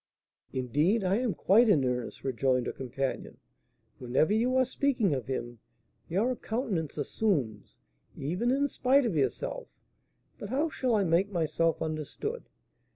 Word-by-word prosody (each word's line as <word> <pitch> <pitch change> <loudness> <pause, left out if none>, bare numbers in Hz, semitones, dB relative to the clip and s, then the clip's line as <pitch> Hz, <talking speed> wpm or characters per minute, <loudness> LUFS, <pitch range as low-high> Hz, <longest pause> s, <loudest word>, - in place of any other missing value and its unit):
"Indeed, 150 - +1
I 190 +2 +2
am 235 -7 -1
quite 225 +8 +4
in 150 -10 +4
earnest," 125 -1 -3
rejoined 130 -1 +1
her - - -2
companion; 130 +1 -4 0.6
"whenever 130 +10 +1
you 240 +4 +2
are 260 - +4
speaking 250 - +1
of 130 -5 -3
him, 120 -3 -4 0.5
your 220 +9 +1
countenance 215 - -3
assumes, 140 - -1 0.4
even 180 - -1
in 280 +2 +2
spite 270 0 +2
of 215 -8 -1
yourself, 135 -5 -1 0.7
but 205 - -6
how 290 +7 0
shall 255 -6 0
I 205 - +3
make 180 +3 +2
myself 165 -2 0
understood?" 155 - -5
175 Hz, 140 wpm, -29 LUFS, -, 0.7 s, quite